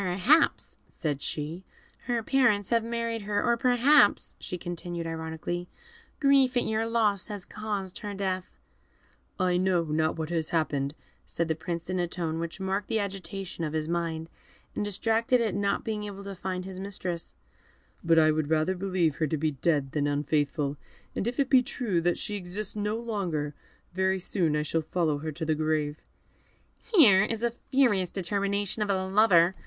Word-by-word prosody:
"Perhaps," 195 - +3
said 145 -5 -3
she, 160 +5 -4 0.4
"her 235 -2 0
parents 215 -6 +2
have 230 -1 +2
married 230 -1 -2
her; 205 0 -1
or 235 - +3
perhaps," 250 +5 +4
she 180 - -5
continued, 175 -1 -4
ironically, 165 +2 -4 0.5
"grief 275 -3 +4
at - - +3
your 220 +1 0
loss 215 -5 +1
has 205 -3 -6
caused 200 -4 -4
her 205 -2 -5
death." 185 -2 -3 0.8
"I 180 -1 +2
know 180 -2 +2
not 155 0 0
what 160 +1 -3
has 165 -2 -1
happened," 145 -3 0 0.3
said 170 - -2
the - - +3
Prince, 170 +1 -5
in 185 0 -1
a 175 - +1
tone 165 -2 -3
which 170 +3 -5
marked 195 +1 -2
the 225 - 0
agitation 195 -3 -4
of 155 -1 -2
his 155 -1 -1
mind, 165 -1 -2 0.5
and - - -1
distracted 225 +4 +1
at 225 -4 0
not 200 0 0
being 215 -2 -2
able 200 -1 -7
to 200 0 -6
find 185 0 -4
his 190 -1 -7
mistress; 185 -3 -5 0.7
"but 165 0 +4
I 155 -1 +6
would 155 -1 -1
rather 160 +3 +2
believe 180 -5 0
her 155 - +1
to 155 - -1
be 155 +1 0
dead 145 -1 0
than 145 0 0
unfaithful; 145 0 0 0.4
and 205 - -1
if 245 +2 -3
it 275 - +3
be 260 -1 +6
true 235 -8 -1
that 175 +1 +1
she 210 - -3
exists 195 +2 -4
no 210 +1 -1
longer, 185 -11 -2 0.4
very 190 +1 +1
soon 175 -4 0
I 150 - +1
shall 160 +2 0
follow 155 -2 0
her 155 +1 -4
to 160 +2 -5
the 155 - +2
grave." 155 -1 -1 1.0
"Here 215 - +8
is 225 +1 -2
a 235 - +2
furious 235 -7 +1
determination 200 +2 -1
of 210 - 0
a 190 -1 +1
lover!" 190 -3 +5
185 Hz, 180 wpm, -28 LUFS, 160-210 Hz, 1.0 s, Here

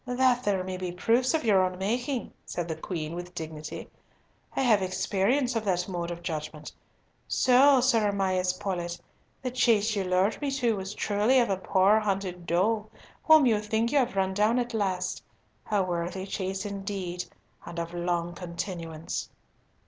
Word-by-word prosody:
"That 250 0 +3
there 195 -4 +1
may 185 0 -4
be 180 -1 -4
proofs 235 - +2
of 320 - 0
your 200 -5 +4
own 185 0 -1
making," 240 +6 -2
said 175 -1 -4
the 160 - -3
Queen, 160 -1 -5
with 175 +1 -7
dignity. 155 -1 -6 0.7
"I - - +1
have 225 -6 +4
experience 205 +7 +1
of 225 - 0
that 180 -2 0
mode 175 -3 -3
of 175 0 -6
judgment. 155 -2 -5 0.6
So, 260 +1 +5
Sir 230 -5 +3
Amias 185 -2 +1
Paulett, 175 -3 -3 0.4
the 255 - -2
chase 225 -3 +3
you 200 - 0
lured 185 +6 +1
me 290 - 0
to 245 -5 +1
was 195 +1 -5
truly 210 +5 +2
of 235 -4 +2
a 190 - +1
poor 190 +3 +3
hunted 190 -4 -3
doe 210 +5 +1 0.4
whom 315 -3 +7
you 220 -4 +3
think 220 +2 0
you 290 - +4
have 250 -5 0
run 190 -1 +1
down 210 +4 +2
at 245 -1 -1
last. 185 -4 -1 0.5
A 205 -3 +2
worthy 180 +1 -3
chase 190 0 -3
indeed, 195 -3 -4 0.4
and 170 - -9
of 170 0 -4
long 175 0 -1
continuance!" 170 -2 -5
195 Hz, 170 wpm, -28 LUFS, 180-225 Hz, 0.7 s, whom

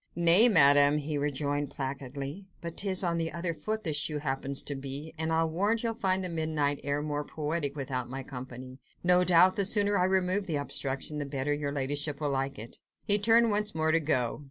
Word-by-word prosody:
"Nay, 175 +7 +7
Madame," 145 -5 +5
he 150 +1 -4
rejoined 145 0 -2
placidly, 140 +6 -6
"but 170 -1 -7
'tis 195 -1 +1
on 170 -2 -1
the 165 0 -2
other 170 0 -3
foot 215 +6 -4
the 160 - -2
shoe 150 +1 0
happens 135 -1 -1
to 145 - -3
be, 140 +3 -7
and 160 0 -2
I'll 165 0 +1
warrant 205 +8 -1
you'll 230 -1 -1
find 190 -3 0
the - - 0
midnight 155 -3 -1
air 145 +1 -2
more 150 -1 -3
poetic 150 -1 -3
without 130 -3 -4
my 135 +1 -6
company: 130 0 -9 0.2
no 180 0 +4
doubt 180 +3 +4
the 200 - +2
sooner 205 +1 +2
I 180 - +2
remove 190 +1 0
the 160 - -2
obstruction 145 +1 -3
the 145 - -3
better 140 +1 -2
your 145 -1 -3
ladyship 145 +1 -2
will 150 -2 -2
like 135 0 -2
it." 110 +2 -9 0.3
He 205 0 +5
turned 230 +2 +4
once 210 -3 0
more 160 0 +1
to 165 - +3
go. 130 -6 -1
150 Hz, 205 wpm, -28 LUFS, 140-180 Hz, 0.3 s, Nay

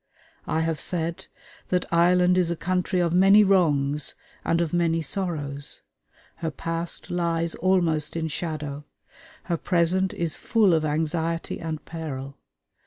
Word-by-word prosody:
I 160 - 0
have 160 -1 -1
said 170 -1 -3 0.4
that 180 -1 0
Ireland 180 +1 +4
is 180 -2 +2
a 170 - 0
country 180 +1 -1
of 170 -1 +1
many 195 +3 +7
wrongs 150 -7 +2 0.3
and 165 - +1
of 170 -2 -1
many 165 -1 +1
sorrows. 145 -5 -3 0.5
Her 165 -1 -2
past 165 +3 -4
lies 170 -1 0
almost 165 -5 +1
in 165 -1 -1
shadow. 150 -3 -4 0.6
Her 170 -2 -1
present 180 +3 +1
is 170 -3 -2
full 215 -6 +3
of 160 -1 +2
anxiety 160 +2 -1
and 160 -2 -5
peril. 140 -5 -6
165 Hz, 135 wpm, -25 LUFS, 155-180 Hz, 0.6 s, many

